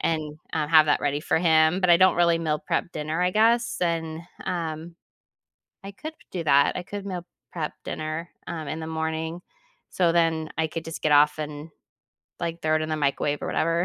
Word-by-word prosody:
and, 155 Hz, -2 st, -2 dB
uh, 155 Hz, -2 st, 0 dB
have 155 Hz, -1 st, +7 dB
that 145 Hz, -, +2 dB
ready 145 Hz, 0 st, 0 dB
for 155 Hz, -, +1 dB
him, 160 Hz, +1 st, +4 dB
but 180 Hz, -2 st, +3 dB
I 170 Hz, -, +8 dB
don't 185 Hz, 0 st, +5 dB
really 170 Hz, -1 st, +4 dB
meal 155 Hz, -2 st, 0 dB
prep 170 Hz, +4 st, -2 dB
dinner, 155 Hz, +2 st, -3 dB
I 180 Hz, -, +2 dB
guess, 230 Hz, +3 st, +2 dB
and, 165 Hz, -2 st, -1 dB, 0.2 s
um, 165 Hz, -1 st, -4 dB, 0.9 s
I 195 Hz, -, -6 dB
could 310 Hz, +10 st, -8 dB, 0.2 s
do 175 Hz, -3 st, -3 dB
that. 140 Hz, -2 st, +4 dB
I 180 Hz, -, -3 dB
could 200 Hz, 0 st, -6 dB
meal 180 Hz, -3 st, -5 dB, 0.3 s
prep 160 Hz, -3 st, -3 dB
dinner, 155 Hz, +2 st, -4 dB, 0.2 s
um, 160 Hz, -3 st, -5 dB
in 155 Hz, -, -3 dB
the 160 Hz, -, -5 dB
morning, 160 Hz, +1 st, -3 dB, 0.5 s
so 175 Hz, -2 st, +2 dB
then, 165 Hz, -2 st, +1 dB
I 160 Hz, -, +2 dB
could 165 Hz, +1 st, -5 dB
just 165 Hz, 0 st, -7 dB
get 155 Hz, -, +2 dB
off 150 Hz, +1 st, +5 dB
and, 150 Hz, +1 st, -6 dB, 0.7 s
like, 170 Hz, 0 st, -3 dB
throw 155 Hz, 0 st, +2 dB
it 155 Hz, -, -1 dB
in 155 Hz, -, -3 dB
the 155 Hz, -, 0 dB
microwave 145 Hz, 0 st, 0 dB
or -, -, -3 dB
whatever, 165 Hz, +2 st, +1 dB
160 Hz, 205 wpm, -25 LUFS, 155-170 Hz, 0.9 s, I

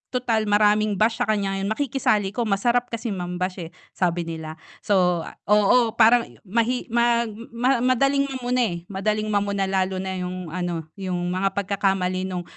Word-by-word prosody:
tutal 225 Hz, -4 st, 0 dB
maraming 210 Hz, 0 st, +3 dB
bash 225 Hz, +3 st, +1 dB
sa -, -, 0 dB
kanya 200 Hz, -2 st, 0 dB
ngayon 195 Hz, -, -2 dB
makikisali 220 Hz, -6 st, 0 dB
'ko 240 Hz, -, 0 dB
masarap 240 Hz, +5 st, +1 dB
kasi 230 Hz, 0 st, -3 dB
mam-bash, 180 Hz, 0 st, -4 dB
eh," 165 Hz, -, -9 dB, 0.2 s
sabi 175 Hz, -1 st, 0 dB
nila. 160 Hz, -1 st, -6 dB, 0.3 s
So, 180 Hz, -4 st, +2 dB, 0.2 s
oo, 210 Hz, +3 st, +4 dB
parang 235 Hz, +1 st, +5 dB, 0.2 s
mahi 235 Hz, +5 st, 0 dB
mag 235 Hz, 0 st, +2 dB, 0.2 s
ma 245 Hz, +2 st, +1 dB
madaling 275 Hz, +2 st, +3 dB
mamuna, 250 Hz, -2 st, -1 dB
eh, 175 Hz, -6 st, -1 dB
madaling 215 Hz, +2 st, -1 dB
mamuna 200 Hz, -2 st, 0 dB
lalo 190 Hz, -1 st, 0 dB
na 190 Hz, 0 st, -4 dB
yung 180 Hz, -1 st, -5 dB
ano 175 Hz, -3 st, -3 dB
yung 180 Hz, -2 st, -3 dB
mga 195 Hz, +1 st, 0 dB
pagkakamali 190 Hz, -2 st, 0 dB
nung, 180 Hz, -1 st, -4 dB
200 Hz, 160 wpm, -23 LUFS, 185-235 Hz, 0.3 s, parang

